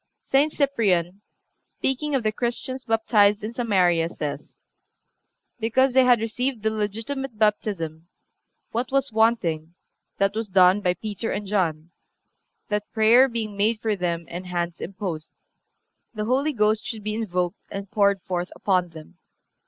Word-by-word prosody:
(359) 280 +3 +4
St. - - -17 0.6
Cyprian, 200 - -29 0.4
speaking 285 +2 -2
of 260 - 0
the 215 - +1
Christians 250 +3 -3
baptized 210 -2 +3
in 220 +2 -4
Samaria, 180 -8 +2
says: 150 -3 -6 1.0
"Because 245 +4 +2
they 260 0 +6
had 245 -3 +5
received 235 +1 -2
the 220 - +2
legitimate 225 +4 -3
baptism,... 185 -7 -1 0.6
what 240 +3 -2
was 275 -1 +1
wanting, 180 -8 +1 0.4
that 195 0 +2
was 220 0 -2
done 185 +1 +5
by 180 -2 +1
Peter 215 +2 -4
and 210 - -3
John, 175 -5 -1 0.8
that 210 0 -2
prayer 230 +4 +6
being 220 -3 -4
made 215 +2 +1
for 215 -1 0
them 170 -3 -2
and 180 +2 -7
hands 175 -1 -3
imposed, 180 -4 -5 0.8
the 210 0 -2
Holy 275 +6 +1
Ghost 215 -2 +2
should 220 -3 -5
be 215 0 -2
invoked 180 -4 -2
and 195 -1 -7
poured 200 -3 +2
forth 180 -1 -3
upon 185 -3 +1
them. 160 -2 -13
210 Hz, 145 wpm, -24 LUFS, 180-230 Hz, 1.0 s, they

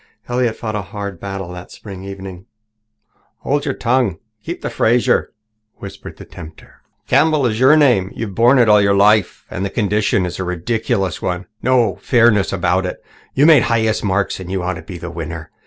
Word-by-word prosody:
Elliott 120 -2 0
fought 110 -2 -5
a 105 - -2
hard 100 -2 -7
battle 95 -2 -6
that 90 0 -9
spring 95 -3 -10
evening. 95 -1 -9 0.9
"Hold 145 +1 -1
your 135 - -2
tongue 125 +1 +1
and 85 -5 -8 0.2
keep - - -6
the - - -3
Fraser," 120 +2 +2 0.4
whispered 100 0 -10
the - - -11
tempter. 80 -2 -13 0.3
"Campbell 145 +1 +3
is 110 -2 -1
your 135 +5 +6
name. 120 -11 +3
You've 110 -4 -5
borne 120 +6 +4
it 120 -2 +4
all 105 -1 +6
your 100 0 +3
life. 105 0 +3
And 90 - -4
the 100 - -1
condition 105 -1 0
itself 90 - -4
is - - -8
a - - -1
ridiculous 95 +1 -2
one 90 0 -3 0.2
no 120 -6 +2
fairness 115 -5 +3
about 95 0 0
it. - - -8 0.3
You 140 - +4
made 155 -5 +7
the - - -1
highest 110 -2 +1
marks 100 -1 -1
and 95 -1 -8
you 95 -2 -2
ought 95 +1 -1
to - - -8
be 90 - -9
the 85 0 -7
winner. 80 -1 -7
100 Hz, 200 wpm, -18 LUFS, 95-120 Hz, 0.9 s, made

